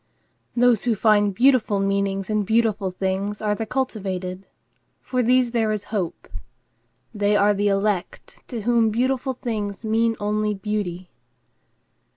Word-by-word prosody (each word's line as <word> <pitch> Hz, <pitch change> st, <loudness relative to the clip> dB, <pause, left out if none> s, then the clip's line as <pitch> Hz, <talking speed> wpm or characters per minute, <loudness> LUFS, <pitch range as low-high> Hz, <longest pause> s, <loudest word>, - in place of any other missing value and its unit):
Those 245 Hz, -2 st, +3 dB
who 235 Hz, -2 st, +2 dB
find 205 Hz, -1 st, +3 dB
beautiful 240 Hz, -2 st, +3 dB
meanings 195 Hz, -1 st, 0 dB
in 215 Hz, 0 st, +1 dB
beautiful 220 Hz, -2 st, +1 dB
things 190 Hz, +2 st, -2 dB
are 210 Hz, -1 st, 0 dB
the 220 Hz, +1 st, -4 dB
cultivated. 195 Hz, -7 st, -3 dB, 0.5 s
For 255 Hz, -1 st, -1 dB
these 250 Hz, 0 st, +3 dB
there 225 Hz, -2 st, +1 dB
is 210 Hz, -1 st, -2 dB
hope. 185 Hz, -6 st, -3 dB, 0.9 s
They 205 Hz, -1 st, +1 dB
are 205 Hz, 0 st, +4 dB
the 205 Hz, +1 st, 0 dB
elect 195 Hz, -2 st, -2 dB
to 235 Hz, -4 st, -5 dB
whom 230 Hz, 0 st, +3 dB
beautiful 255 Hz, +3 st, 0 dB
things 215 Hz, -4 st, -4 dB
mean 225 Hz, +1 st, +1 dB
only 210 Hz, 0 st, 0 dB
beauty. 195 Hz, -3 st, -4 dB
210 Hz, 135 wpm, -23 LUFS, 195-230 Hz, 0.9 s, are